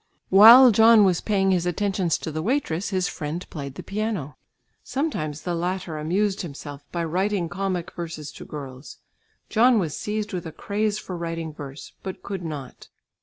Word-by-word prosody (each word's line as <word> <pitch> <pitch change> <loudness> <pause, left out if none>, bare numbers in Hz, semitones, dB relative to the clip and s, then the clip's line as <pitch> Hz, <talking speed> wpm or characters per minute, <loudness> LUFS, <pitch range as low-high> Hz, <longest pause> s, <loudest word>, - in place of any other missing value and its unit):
While 230 +6 +9
John 225 0 +7
was 180 -3 +2
paying 195 -2 +1
his 180 -1 +1
attentions 185 -2 0
to 160 - -6
the 155 +1 -3
waitress, 200 - -1
his 185 -2 0
friend 155 +4 -5
played 140 -3 -6
the - - -8
piano. 205 -8 -3 0.5
Sometimes 155 - -3
the 175 - -2
latter 175 -1 -3
amused 190 +6 0
himself 145 -4 -8
by 170 -1 -2
writing 185 +2 0
comic 185 -1 -3
verses 160 -4 -6
to - - -10
girls. 135 -2 -9 0.5
John 235 +2 +4
was 165 -7 -1
seized 210 0 -3
with 175 -2 -4
a - - -7
craze 210 +5 -2
for 185 - -6
writing 165 -2 -4
verse 140 -1 -9
but 190 -1 -7
could 195 -2 -5
not. 145 -6 -7
180 Hz, 170 wpm, -24 LUFS, 155-205 Hz, 0.5 s, While